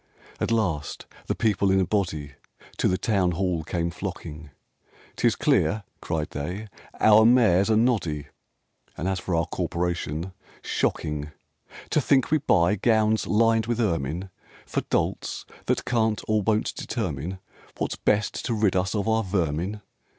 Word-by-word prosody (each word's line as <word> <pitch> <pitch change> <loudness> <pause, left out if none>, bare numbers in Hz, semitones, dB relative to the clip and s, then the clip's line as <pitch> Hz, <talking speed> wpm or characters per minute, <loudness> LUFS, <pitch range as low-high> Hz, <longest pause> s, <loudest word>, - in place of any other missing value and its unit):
Ill - - +1
At - - -4
last 90 -10 -1 0.2
the - - 0
people 100 -3 +2
in 95 0 +4
a 95 - +2
body 85 -7 -1 0.5
To - - +2
the 90 - +2
Town 95 -5 +1
Hall 90 -2 -1
came 85 0 -2
flocking: 80 -5 -7 0.7
'Tis - - +2
clear," 105 0 +2 0.2
cried 80 -2 -2
they, 90 +9 -5 0.3
"our 110 0 +7
Mayor's 110 -5 +5
a 110 - +4
noddy; 100 - +1 0.7
And 85 - -2
as 95 -1 0
for 95 -1 -2
our 80 -1 +2
Corporation, 85 0 -2 0.3
shocking 75 -1 -1 0.6
To 150 - +3
think 135 0 +2
we 155 - +4
buy 100 -6 +3
gowns 110 0 +2
lined 115 0 +3
with 120 -1 -1
ermine 85 - -1 0.3
For - - -1
dolts - - -1 0.2
that - - 0
can't 110 -3 +1
or 110 -1 +2
won't 110 +1 +1
determine 90 - -3 0.4
What's - - -2
best 105 0 0
to 120 - 0
rid 105 -3 +2
us 95 +3 0
of 105 0 -1
our 110 0 +2
vermin! 90 +1 -1
95 Hz, 150 wpm, -25 LUFS, 85-110 Hz, 0.7 s, our